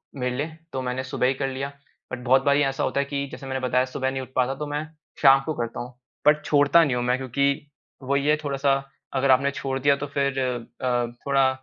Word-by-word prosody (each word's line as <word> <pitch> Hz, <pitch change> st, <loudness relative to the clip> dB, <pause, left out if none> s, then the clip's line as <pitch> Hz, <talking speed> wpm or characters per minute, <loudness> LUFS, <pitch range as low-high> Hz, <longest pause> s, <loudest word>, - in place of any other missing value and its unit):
मेरे 125 Hz, -1 st, -2 dB
लिए 155 Hz, +4 st, -4 dB, 0.2 s
तो 130 Hz, -, -2 dB
मैंने 125 Hz, +1 st, -2 dB
सुबह 130 Hz, -1 st, 0 dB
ही 135 Hz, -, +2 dB
कर 135 Hz, +1 st, -2 dB
लिया। 135 Hz, +2 st, -4 dB, 0.4 s
बट 130 Hz, -, -4 dB
बहुत 130 Hz, +2 st, +4 dB
बारी 140 Hz, 0 st, +3 dB
ऐसा 135 Hz, -1 st, -1 dB
होता 140 Hz, -, 0 dB
है 140 Hz, -, +1 dB
कि 140 Hz, 0 st, -3 dB
जैसे 135 Hz, -, -9 dB
मैंने 130 Hz, 0 st, -2 dB
बताया 125 Hz, +1 st, +2 dB
सुबह 130 Hz, 0 st, -2 dB
नहीं 135 Hz, 0 st, -3 dB
उठ 130 Hz, -, -9 dB
पाता, 130 Hz, +1 st, +1 dB
तो 150 Hz, +1 st, -5 dB
मैं 145 Hz, +1 st, -2 dB, 0.4 s
शाम 135 Hz, -1 st, +7 dB
को 155 Hz, -, -1 dB
करता 115 Hz, -3 st, -4 dB
हूँ, 125 Hz, +1 st, -7 dB, 0.3 s
बट 150 Hz, 0 st, +5 dB
छोड़ता 145 Hz, +3 st, +5 dB
नहीं 130 Hz, -5 st, +1 dB
हूँ 120 Hz, -, -1 dB
मैं 125 Hz, +1 st, +1 dB
क्योंकि 140 Hz, +2 st, 0 dB, 0.4 s
वही 140 Hz, +1 st, 0 dB
है 150 Hz, -, +5 dB
थोड़ा-सा 140 Hz, -1 st, +1 dB, 0.4 s
अगर 135 Hz, 0 st, +3 dB
आपने 140 Hz, +2 st, +4 dB
छोड़ 135 Hz, -1 st, -3 dB
दिया 140 Hz, +1 st, +4 dB
तो 145 Hz, +1 st, -5 dB
फिर 140 Hz, -1 st, 0 dB
अ, 125 Hz, 0 st, -1 dB, 0.2 s
थोड़ा 135 Hz, -1 st, +4 dB
135 Hz, 230 wpm, -24 LUFS, 130-140 Hz, 0.4 s, शाम